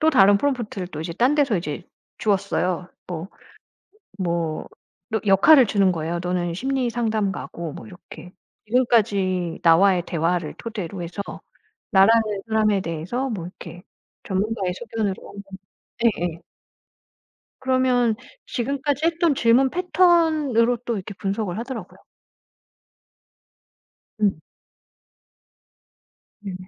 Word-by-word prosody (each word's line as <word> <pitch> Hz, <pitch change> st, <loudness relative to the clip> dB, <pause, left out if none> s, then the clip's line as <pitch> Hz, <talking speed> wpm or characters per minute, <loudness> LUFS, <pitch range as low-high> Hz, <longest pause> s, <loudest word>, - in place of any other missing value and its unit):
또 315 Hz, 0 st, +4 dB
다른 200 Hz, -6 st, +6 dB
프롬프트를 215 Hz, -7 st, -2 dB
또 155 Hz, -, -7 dB
이제 165 Hz, +1 st, -4 dB
딴 250 Hz, -, +2 dB
데서 275 Hz, -9 st, +2 dB
이제 155 Hz, -2 st, -4 dB, 0.4 s
줬어요. 190 Hz, -3 st, 0 dB, 0.2 s
뭐 175 Hz, +1 st, -5 dB, 0.9 s
뭐 170 Hz, -4 st, -2 dB, 0.4 s
너 220 Hz, -2 st, -1 dB
역할을 240 Hz, +7 st, +7 dB
주는 195 Hz, -2 st, +3 dB
거예요. 165 Hz, +1 st, -3 dB
"너는 175 Hz, -1 st, -1 dB
심리상담가고" 220 Hz, -, -2 dB
뭐 -, -, -10 dB
이렇게. 180 Hz, -2 st, -12 dB, 0.3 s
"지금까지 205 Hz, -7 st, +1 dB
나와의 175 Hz, +2 st, +5 dB
대화를 170 Hz, -1 st, -1 dB
토대로 200 Hz, -6 st, -6 dB
해서 175 Hz, +4 st, -6 dB, 0.7 s
나라는 225 Hz, +2 st, +6 dB, 0.3 s
사람에 215 Hz, -2 st, +2 dB
대해서 180 Hz, +10 st, -3 dB
뭐 205 Hz, -9 st, -4 dB
이렇게 175 Hz, -1 st, -10 dB, 0.4 s
전문가의 195 Hz, -1 st, -1 dB
소견으로" 220 Hz, -4 st, -4 dB, 0.7 s
예예. 175 Hz, -7 st, 0 dB, 1.2 s
그러면 255 Hz, -3 st, +2 dB, 0.3 s
지금까지 280 Hz, +4 st, -1 dB
했던 335 Hz, -2 st, +2 dB
질문 250 Hz, +2 st, +4 dB
패턴으로 320 Hz, -10 st, +3 dB
또 235 Hz, -, 0 dB
이렇게 200 Hz, +1 st, -6 dB
분석을 195 Hz, -1 st, -2 dB
하더라고요. 230 Hz, -5 st, -7 dB, 2.2 s
음. 200 Hz, -5 st, +2 dB, 2.0 s
네. 195 Hz, -3 st, -6 dB
205 Hz, 245 characters per minute, -23 LUFS, 180-245 Hz, 2.2 s, 역할을